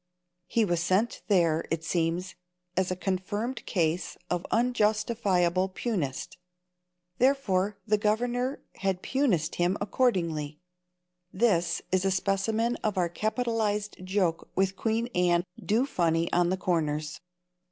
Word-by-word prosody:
He 225 +3 +2
was 175 -3 0
sent 190 +7 +1
there, 170 -5 +3
it 165 0 -2
seems, 170 +2 -1 0.4
as 190 0 +1
a 185 - -1
confirmed 205 +6 -2
case 170 -1 0
of 180 0 -1
unjustifiable 210 -6 +2
Punist. 185 - -3 0.8
Therefore 210 -7 +2
the 210 -1 +2
governor 245 +5 0
had 190 -1 -1
Punist 225 - +1
him 175 +2 +2
accordingly. 170 - 0 0.7
This 180 -5 +1
is 185 0 +2
a 195 - +2
specimen 210 +5 0
of 210 -3 -2
our 175 -2 +2
capitalized 215 -1 -1
joke 185 -3 0
with 190 +1 +1
Queen 225 +2 0
Anne 175 -1 +3 0.2
do 230 +5 +2
funny 170 - 0
on 175 0 +3
the 190 - 0
corners. 155 -4 -1
190 Hz, 120 wpm, -28 LUFS, 175-220 Hz, 0.8 s, there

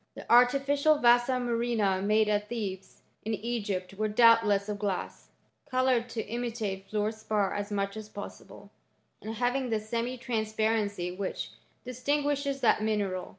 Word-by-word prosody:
* - - -49
The - - -9
artificial 275 +5 +4
vasa 240 0 +4
murrhina 235 -6 0
made 215 +1 +3
at 210 0 0
Thebes, 195 -5 -5 0.2
in 220 +1 -1
Egypt, 205 -4 -3
were 215 +2 -1
doubtless 215 -2 +4
of 210 -1 -4
glass, 200 -3 -4 0.4
coloured 255 -2 +1
to 225 -1 -3
imi 240 +2 -3
tate 195 -4 -5
fluor 210 0 0
spar 215 -2 -1
as 205 0 -3
much 200 0 -1
as 215 -1 -8
possible, 200 0 -10 0.5
and 220 +2 -6
having 245 +2 0
tha 220 -1 +1
semi 235 +4 -3
transparency 220 -5 -1
which 195 0 -4 0.3
distinguishes 280 +2 -1
that 230 - +3
mineral. 205 -4 -1
220 Hz, 150 wpm, -29 LUFS, 205-245 Hz, 0.5 s, artificial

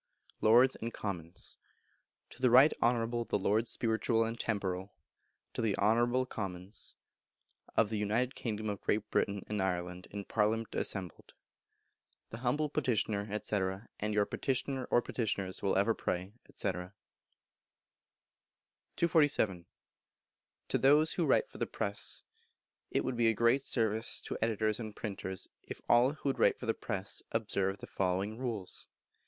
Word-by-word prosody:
Lords 120 +4 +6
and 115 +1 -4
Commons. 90 -5 -5 0.7
To - - -13
the 130 - +5
Right 130 +6 +7
Honourable 120 0 +2
the - - 0
Lords 110 +4 +1
Spiritual 115 0 +1
and 115 +1 -3
Temporal 95 -3 -2 0.6
(To - - -2
the 110 -3 +1
Honourable 120 +4 +3
the - - -1
Commons) 95 -3 -6 0.8
of 110 - +4
the 110 -1 -2
United 115 +5 0
Kingdom 110 -2 -3
of 100 -2 -3
Great 105 0 -1
Britain 100 -1 0
and 105 -2 -1
Ireland, 90 -1 -2
in 100 -1 -6
Parliament 110 +1 0
assembled. 95 -4 -3 1.0
The 115 - -6
humble 130 +5 +1
Petitioner 110 -8 0
&c. - - -1 0.4
And 105 +1 -1
your 105 -1 +4
Petitioner 130 +1 -1
[or 120 - +2
Petitioners] 100 -5 -2
will 100 - +1
ever 100 +4 +3
pray, 95 -1 -3 0.2
&c. 100 - 0
247. 100 - -4 1.0
To - - +2
those 150 +4 +5
who 170 - 0
Write - - +3
for - - -12
the - - 0
Press. - - -2 0.7
It - - 0
would 130 - -1
be 120 -1 +4
a 115 - +3
great 115 +5 +4
service 110 -3 +1
to - - -4
editors 110 -1 +1
and 110 -3 -6
printers 95 -3 -4
if - - -8
all 120 +4 +5
who 145 -3 -1
write - - +3
for - - -6
the 115 - +2
press 100 -4 -2
would 115 0 0
observe 95 -1 -1
the - - -9
following 95 +4 -1
rules. 115 -7 -4
110 Hz, 150 wpm, -33 LUFS, 100-120 Hz, 1.0 s, Right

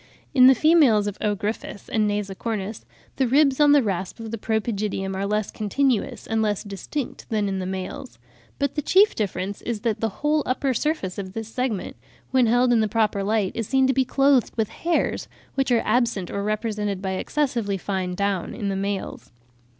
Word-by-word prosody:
In 255 -2 +8
the 265 - +7
females 280 -8 +5
of 205 -1 -3
O. 210 -1 +1
gryphus 205 0 -5
and 215 -2 +1
nasicornis 205 +1 -3 0.3
the 265 - +2
ribs 275 +1 +3
on 295 -1 +6
the 290 -2 +6
rasp 190 0 -3
of 225 -1 -6
the 230 - -3
pro 220 +1 0
pygidium 200 -3 -3
are 195 +1 -2
less 210 0 -1
continuous 240 +2 0
and 225 0 0
less 210 -2 0
distinct 205 - -6
than 210 -2 0
in 195 -1 -2
the 185 - -3
males; 190 -1 -6 0.4
but 280 -1 -1
the 300 - -1
chief 395 +8 +4
difference 200 -1 -3
is 230 -3 -3
that 225 -2 -1
the 225 - 0 0.2
whole 300 +1 +3
upper 260 +1 0
surface 240 - -2
of 190 -1 -6
this 225 0 -5
segment, 245 -4 -3 0.3
when 255 -2 +4
held 245 +2 +4
in 235 - +4
the 215 - +2
proper 210 -2 +1
light, 205 -2 +1
is 225 -3 -3
seen 265 -1 +3
to 265 - +3
be 265 +1 +3
clothed 270 -1 +2
with 220 -2 0
hairs, 340 0 -1 0.3
which 270 -1 0
are 235 - +3
absent 225 -5 +1
or 200 - -3
are - - -2
represented 210 -2 -2
by 190 0 -3
excessively 230 -1 -1
fine 185 -1 -3
down 200 -2 -1
in 200 - -3
the 195 - -1
males. 195 0 -4
215 Hz, 200 wpm, -24 LUFS, 200-255 Hz, 0.4 s, In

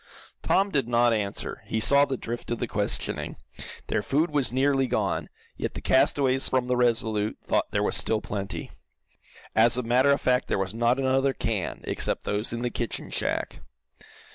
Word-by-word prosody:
Tom 195 +1 +2
did 135 -7 +1
not 120 0 +3
answer. 100 -3 -3
He 110 - -1
saw 140 +5 +5
the 135 -2 -3
drift 120 0 -6
of 120 - -1
the 120 - -2
questioning. 105 -2 -3 0.5
Their - - -1
food 155 +4 0
was 145 -5 +2
nearly 135 +1 +2
gone, - - -1 0.3
yet - - -4
the - - -4
castaways 130 0 +2
from 130 -1 +1
the 125 0 0
RESOLUTE 110 -3 +1
thought - - 0
there - - 0
was - - 0
still 110 - +1
plenty. 100 -2 -5 0.8
As 115 +2 +5
a 125 - -1
matter 125 +4 +3
of 140 - +3
fact 125 0 +1
there - - 0
was 95 0 -2
not 120 +2 +2
another 135 0 +2
can, 110 -6 -3
except - - -2
those 105 +2 -1
in 120 +1 -3
the 120 - -1
kitchen 120 - -4
shack. - - -2
120 Hz, 180 wpm, -26 LUFS, 110-135 Hz, 0.8 s, saw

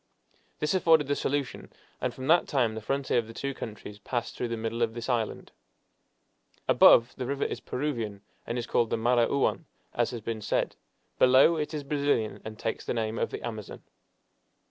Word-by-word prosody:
This 150 - 0
afforded 165 -5 +4
the 145 +1 0
solution, 140 -2 -3 0.3
and - - 0
from 130 - -8
that 170 +4 +4
time 120 -6 +1
the 110 - -6
frontier 135 +2 0
of 115 - -4
the 115 - -11
two 140 0 -3
countries 105 -4 -8
passed 120 +3 -3
through 125 - -2
the 115 0 -3
middle 115 +1 -3
of 115 -1 +1
this 120 0 -5
island. 120 -4 -2 1.2
Above, 115 +1 +6
the 125 - -3
river 140 +1 -1
is - - -3
Peruvian, 115 -8 -3 0.2
and 120 - -2
is 120 - -2
called 120 -1 +1
the - - 0
Marañon, 120 +7 +2 0.3
as 120 -1 +1
has 120 -2 -6
been 110 0 -4
said. - - -1 0.4
Below, 130 +6 +6
it 150 -2 -2
is 150 - -4
Brazilian, 140 -8 0
and 110 0 -8
takes 115 - -3
the - - -3
name 110 0 -2
of - - 0
the - - -7
Amazon. 110 -3 -7
120 Hz, 190 wpm, -28 LUFS, 115-140 Hz, 1.2 s, Above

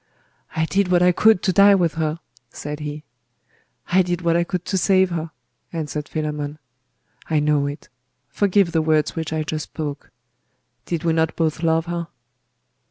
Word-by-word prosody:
'I 160 - +1
did 195 +3 +1
what 180 -1 +3
I 180 - +6
could 220 +2 +4
to 185 - +2
die 200 +2 +7
with 175 -4 +1
her!' 160 0 -2 0.3
said 150 +4 -6
he. 150 0 -6 0.9
'I 185 +2 +5
did 175 -1 -2
what 170 -1 +2
I 170 - +3
could 180 0 -4
to 195 - -2
save 190 0 +3
her!' 165 -1 -3 0.4
answered 150 -2 -4
Philammon. 150 -1 -3 0.7
'I 155 -2 +2
know 145 -1 +2
it. 145 +1 -7 0.4
Forgive 200 -3 +2
the 165 -1 +2
words 155 -1 +1
which 160 -1 -3
I 155 -1 -1
just 155 0 -4
spoke. 150 -2 -6 0.8
Did 170 -1 -2
we 165 -1 +2
not 160 -1 +1
both 160 -1 -1
love 165 -1 +2
her? 170 -1 -4
165 Hz, 170 wpm, -22 LUFS, 155-175 Hz, 0.9 s, die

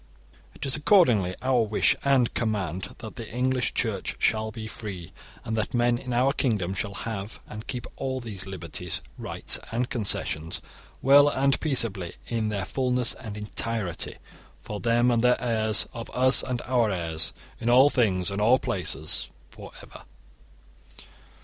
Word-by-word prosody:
IT - - -6
IS 135 - +3
ACCORDINGLY 125 - +4
OUR 130 -2 +3
WISH 105 - +3
AND 135 -4 +3
COMMAND 95 -6 -2
that 110 +2 -9
the 115 -3 -7
English 125 +1 0
Church - - -1
shall 110 0 +1
be 110 +1 -7
free, 100 -6 -7 0.3
and 110 - -2
that 110 +2 -2
men 120 0 +2
in 125 - -7
our 125 +3 +2
kingdom 105 - 0
shall 100 -1 -4
have 105 0 -5
and 110 +2 -9
keep 125 -2 -4
all 130 -1 -2
these 105 -6 -7
liberties, 90 -2 -3 0.2
rights, - - +1
and 120 +2 -2
concessions, 90 -8 0 0.4
well 145 +2 +7
and 140 0 +1
peaceably 115 - 0
in 115 -2 -1
their 100 -2 -2
fulness 125 +1 0
and 110 -4 -8
entirety 105 -3 -2 0.5
for 105 - -6
them 120 +2 +2
and 115 -1 +1
their 125 0 +4
heirs, 110 -3 +3
of 115 0 -7
us 130 +1 +5
and 125 -1 -3
our 120 -3 +2
heirs, 80 -4 -1 0.3
in 115 - -1
all 130 +4 +6
things 100 -7 +1
and 100 +1 -2
all 120 +5 +5
places 80 -8 -2 0.2
for - - -11
ever. - - -12
115 Hz, 155 wpm, -26 LUFS, 100-125 Hz, 0.5 s, well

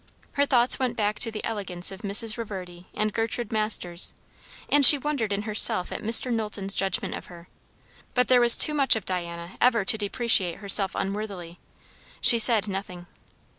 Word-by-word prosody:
Her 285 0 -2
thoughts 245 -1 +1
went 255 -2 -4
back 210 -1 -3
to 230 - 0
the 215 -1 -8
elegance 190 -5 -3
of 195 +1 -12
Mrs. 210 +2 -2
Reverdy 185 -6 -10
and 215 -1 -4
Gertrude 225 0 -5
Masters, 215 -5 0 0.5
and 290 0 +1
she 290 +3 +11
wondered 275 -6 -5
in 200 +1 -4
herself 210 -4 +1
at - - -7
Mr. 230 +3 +1
Knowlton's 210 -3 -5
judgment 195 +1 -3
of - - -10
her; 170 -1 -16 0.7
but 250 0 0
there 250 -1 +2
was 240 -1 +7
too 305 - +4
much 275 -5 +2
of 220 - -7
Diana 170 -1 -7
ever 235 -5 +1
to 220 - 0
depreciate 205 -4 +1
herself 195 -1 +3
unworthily. 195 -4 -7 0.6
She 235 - +4
said 220 -2 +4
nothing. 190 -3 -8
210 Hz, 170 wpm, -23 LUFS, 190-235 Hz, 0.7 s, she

